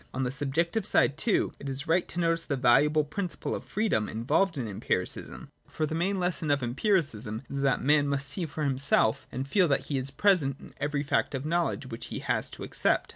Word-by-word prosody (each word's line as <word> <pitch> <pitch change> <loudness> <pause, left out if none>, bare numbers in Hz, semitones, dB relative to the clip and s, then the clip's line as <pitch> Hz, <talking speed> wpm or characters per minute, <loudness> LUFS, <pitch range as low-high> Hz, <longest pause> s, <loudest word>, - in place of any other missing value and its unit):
On 130 - -1
the 125 - -1
subjective 160 +9 0
side, 140 - +3
too, 200 +7 +1
it 140 - -6
is 135 +1 -2
right 170 +3 +2
to 175 - -4
notice 165 -1 +1
the 140 - -1
valuable 140 +5 +4
principle 175 +5 -3
of - - -4
freedom 200 - 0
involved 145 - +1
in 125 -4 -2
Empiricism. 100 - -3 0.2
For 155 - -2
the 155 - -4
main 185 +4 0
lesson 175 -3 -1
of 145 -2 +2
Empiricism 125 - 0
is 140 0 -4
that 135 -2 +1
man 145 +1 +4
must 140 0 -1
see 165 +3 -3
for 155 +1 -4
himself 135 -5 +2
and 130 +2 -4
feel 185 +4 +3
that 140 - +1
he 140 -2 0
is 130 +1 -2
present 145 -4 +2
in - - -13
every 145 0 -1
fact 140 - 0
of 135 +2 -4
knowledge 170 -3 0
which 115 -2 -7
he - - -5
has - - 0
to - - -9
accept. - - 0
145 Hz, 215 wpm, -28 LUFS, 135-170 Hz, 0.2 s, valuable